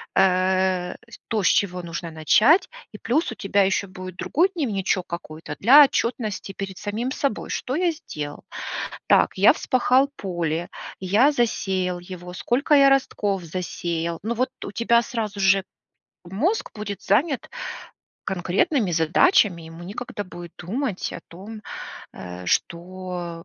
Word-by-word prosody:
э, 185 -1 +2
с - - -11
то, 220 -3 0
с - - +4
чего 180 -3 +2
нужно 170 0 -5
начать. 215 - +4 0.2
И 210 - -9
плюс 255 +6 0
у - - -6
тебя 200 -3 +2
еще 195 +1 0
будет 185 -1 -9
другой 350 +6 +2
дневничок 200 - -1
какой-то 160 -2 -7
для 275 +8 +9
отчетности 230 -7 -2
перед 195 -2 -6
самим 220 +4 -3
собой: 270 -5 -2
"Что 260 - -2
я 350 +1 +2
сделал? 150 - -7 0.6
Так, - - +4
я - - +7
вспахал 260 +1 +2
поле, 175 -4 -2 0.3
я 205 +10 +4
засеял 190 -8 0
его, 180 0 -9
сколько 250 +10 0
я 275 -1 +7
ростков 205 -8 +1
засеял?" 170 -1 -3
Ну 225 +2 -1
вот 255 +2 0 0.2
у - - -6
тебя 235 +2 +3
сразу 215 -4 -4
же 195 0 +4 0.6
мозг 245 - -1
будет 205 -2 -5
занят 270 - +1 0.7
конкретными 190 - 0
задачами, 170 - +3
и - - -11
ему 165 +1 -10
некогда 205 +3 -6
будет 175 -3 -10
думать 210 +3 -3
о - - -6
том, 210 +5 -10 0.5
э, 90 -1 -8
что, 175 - -3
195 Hz, 140 wpm, -24 LUFS, 175-235 Hz, 0.7 s, для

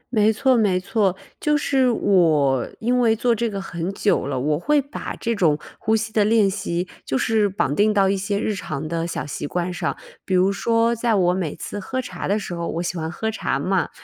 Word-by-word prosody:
没 215 0 +5
错 260 +4 +2
没 200 -5 +2
错， 195 -1 0 0.3
就 300 -1 +2
是 265 -3 +2
我 155 - +2
因 245 +2 +1
为 225 -2 +4
做 235 +1 +2
这 230 +1 -1
个 200 -1 -4
很 175 -1 -4
久 200 -8 +1
了， 135 -2 -2
我 150 +4 0
会 295 +7 +2
把 280 +2 -5
这 230 0 -1
种 160 -8 +2 0.2
呼 220 -1 +1
吸 220 0 -2
的 215 -2 +3
练 215 -1 +4
习 185 -2 -2 0.2
就 135 - -1
是 215 +2 +2
绑 165 -7 -1
定 210 +4 +3
到 200 -2 +3
一 200 - +2
些 200 +1 -2
日 215 - -1
常 155 -6 -5
的 165 +1 -2
小 - - -4
习 145 - -5
惯 180 +2 -2
上。 - - -2 0.3
比 190 - -1
如 185 +2 +4
说 230 +3 +2
在 230 -1 +1
我 180 -2 +3
每 180 -5 -2
次 205 - -6
喝 260 +7 -4
茶 180 -8 -5
的 205 +2 +2
时 195 -4 -5
候 170 -1 -3
我 170 +2 -3
喜 180 - -3
欢 160 -1 -3
喝 220 +4 -2
茶 220 - -1
嘛， 185 -3 0
200 Hz, 245 characters per minute, -22 LUFS, 175-225 Hz, 0.3 s, 没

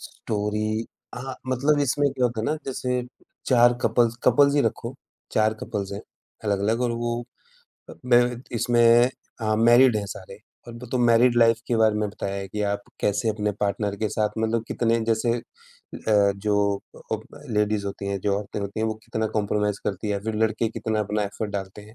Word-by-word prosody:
story 110 +1 -2 0.3
हाँ, 130 +1 -6
मतलब 140 +4 +2
इसमें 145 +1 +2
क्या 125 - 0
होता 120 -2 0
है - - -3
ना 155 - +1
जैसे 125 -1 -1 0.4
4 120 -2 +5
कपल्स 120 -1 +2
कपल्स 140 +3 +5
ही 145 - +4
रखो, 120 +2 -2 0.4
4 110 0 +2
कपल्स 100 -1 -4
हैं, 100 - -5 0.4
अलग-अलग 105 +3 +1
और 120 - +1
वो 120 0 -2 0.7
अ, - - -9
मेरे 120 0 +4 0.2
इसमें 120 +1 +5 0.3
अ, 110 -1 +1
मैरिड 120 +1 +6
हैं 105 -1 -2
सारे 95 0 -9 0.3
और 120 - -8
वो 120 +1 -9
तो 130 - +1
मैरिड 120 +1 +4
लाइफ 115 -1 +4
के 120 - +1
बारे 110 -1 +4
में 105 0 0
बताया 100 -1 -5
है 95 -1 -5
कि 105 +2 -3
आप 100 0 -2 0.2
कैसे 105 +2 +1
अपने 105 -1 -1
पार्टनर 100 0 -1
के 110 +1 -1
साथ 105 +1 0
मतलब 110 +1 0
कितने 115 -1 +1
जैसे 115 +1 +1
अ, - - -9 0.9
जो 100 0 +1 0.4
अ, - - +2 0.3
लेडीज़ 105 -1 0
होती 100 0 -5
हैं, 100 0 -1
जो 100 0 +1
औरतें 105 0 -6
होती 100 +2 -4
हैं, 110 - +1
वो 110 - -1
कितना 110 0 -2
कंप्रोमाइज़ 105 0 0
करती 105 +1 -3
है, 105 - +1
या 100 - -1
फिर 110 -1 -2
लड़के 110 +1 0
कितना 110 -1 -2
अपना 105 0 -1
एफर्ट 105 +1 -4
डालते 100 0 -5
हैं 105 +2 -16
110 Hz, 190 wpm, -24 LUFS, 105-120 Hz, 0.9 s, मैरिड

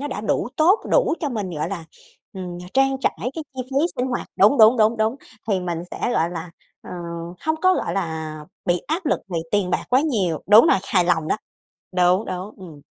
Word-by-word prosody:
nó 290 - -3
đã 210 - -4
đủ 220 +2 -1
tốt, 360 +8 +4
đủ - - +3
cho 300 - -1
mình 210 -7 -3
gọi 155 -1 -3
là, 175 -4 -5 0.5
ừm, 180 -2 -6
mà 180 - -10
trang 270 0 +3
trải - - 0
cái 295 +5 -4
chi 255 - -3
phí 265 +1 -6 0.2
sinh 250 - 0
hoạt 250 -2 -3
đúng, 210 +8 +5
đúng, 220 +3 +7
đúng, 220 +1 +3
đúng 220 +3 0 0.3
thì 195 -3 +1
mình 175 -2 -3
sẽ, - - -7
gọi 170 -5 +1
là, 170 0 -6 0.3
ờ, - - -11 0.6
hông 315 - +2
có, 370 0 +5
gọi - - -2
là, 160 -4 -3 0.3
bị 175 0 +2
áp 325 +3 -2
lực - - +1
về 170 - -2
tiền 200 -3 +1
bạc - - -1
quá 255 +2 +4
nhiều. 205 - -1
Đúng 215 +7 +8
rồi, 195 - +4
hài 180 -3 +3
lòng 160 -3 +1
đó, - - +1 0.6
đúng, 180 +3 +3
đúng, 185 +3 -6
ừm. 150 -3 -13
205 Hz, 220 wpm, -22 LUFS, 175-260 Hz, 0.6 s, Đúng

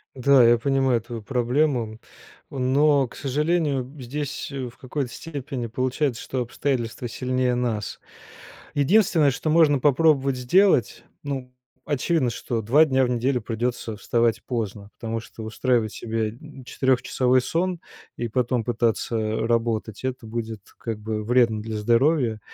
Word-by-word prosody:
Да, 135 +1 +5
я 120 0 +6
понимаю 135 -1 +1
твою 115 0 -7
проблему, 125 -1 0 0.5
но, 140 +2 +3
к - - -15
сожалению, 150 0 0 0.2
здесь, 140 +3 -4
э, 135 -3 -5
в 120 - -19
какой-то 130 -1 -4
степени 135 -6 -5
получается, 130 +2 -1
что 130 - -4
обстоятельства 120 -1 -2
сильнее 125 +1 0
нас. 115 -4 -2 0.8
Единственное, 160 0 +4
что 135 +5 -3
можно 155 -3 +5
попробовать 140 -1 +3
сделать, 130 - +3 0.2
ну, 135 -3 -4 0.3
очевидно, 145 -1 +1
что 115 0 -3
2 140 +9 +5
дня 130 -3 +2
в - - -2
неделю 125 +1 0
придется 115 0 -3
вставать 115 +1 +1
поздно, 105 -4 -4
потому 115 0 -3
что 115 0 -10
устраивать 110 0 0
себе 110 -1 -2 0.3
четырёхчасовой 130 0 +2
сон 175 +5 -1 0.3
и 120 - -3
потом 120 0 0
пытаться 115 -1 0
работать- 115 -2 -1
это 130 -2 -4
будет, 110 -2 -5 0.2
как 115 -2 -4
бы, 105 0 -4
вредно 115 -2 +3
для 110 0 -5
здоровья. 120 +1 +2
125 Hz, 135 wpm, -24 LUFS, 115-140 Hz, 0.8 s, я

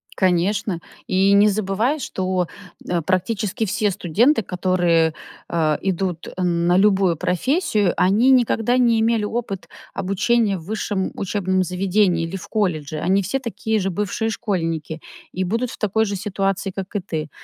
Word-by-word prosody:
Конечно. 185 0 +1 0.3
И 190 +1 +3
не 205 +1 +6
забывай, 215 +8 0
что, 185 -6 -2 0.4
э, 175 -1 0
практически 195 +5 -1
все 210 +1 0
студенты, 215 - +2
которые, 175 -3 +1 0.3
а, 155 -3 0
идут, 185 -2 -2
э, 185 - -6
на 175 0 +2
любую 195 -3 +3
профессию, 210 - +1
они 210 +8 +4
никогда 245 -1 +3
не 235 -3 +3
имели 225 -1 +2
опыт 210 -3 -4 0.2
обучения 200 +2 +1
в 160 - -11
высшем 205 -1 -2
учебном 190 -1 0
заведении 185 -1 +1
или 165 +4 -6
в 195 +2 -7
колледже. 155 -8 -1
Они 190 +4 +2
все 200 +9 -2
такие 220 -3 -2
же 195 - -1
бывшие 210 +4 -2
школьники 165 -7 -3 0.3
и 185 - -2
будут 230 +6 -1
в - - -9
такой 220 +1 +1
же 200 - -3
ситуации, 195 0 -2
как 195 +2 -7
и - - +2
ты. 160 -5 -4
195 Hz, 150 wpm, -21 LUFS, 180-215 Hz, 0.4 s, не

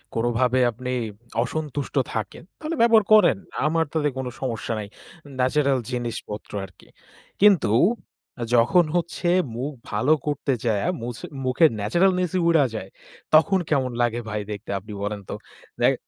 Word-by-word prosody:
কোনভাবে 120 +2 +1
আপনি 125 +2 -6 0.5
অসন্তুষ্ট 145 +1 -4 0.2
থাকেন, 110 -2 -4 0.2
তাহলে 320 +1 -3
ব্যবহার 230 -2 +6
করেন। 185 - +6 0.3
আমার 160 +1 +2
তাতে 150 -2 +1
কোন 130 -1 -3
সমস্যা 120 -3 -3
নাই। 105 - -5 0.5
ন্যাচারাল 135 +1 +2
জিনিসপত্র 120 -4 -5
আরকি। 95 - -19 0.5
কিন্তু 195 - +5 0.8
যখন 120 +10 +5
হচ্ছে 175 0 -1 0.3
মুখ 130 +5 -3 0.2
ভালো 110 +7 +1 0.2
করতে 145 -2 0
যায়া, 110 +1 +1
মুছ 120 0 -5 0.3
মুখের 135 +5 +4
ন্যাচারালনেসই 180 - +1
উইড়া 165 -4 +5
যায়, 95 -3 -6 0.4
তখন 190 +5 +5
কেমন 130 -4 +1
লাগে 120 0 +1
ভাই 105 0 -2
দেখতে? 105 +1 -7
আপনি 105 +3 -10
বলেন 105 0 -3
তো। - - -3 0.5
দেক - - +5
130 Hz, 135 wpm, -24 LUFS, 115-160 Hz, 0.8 s, ব্যবহার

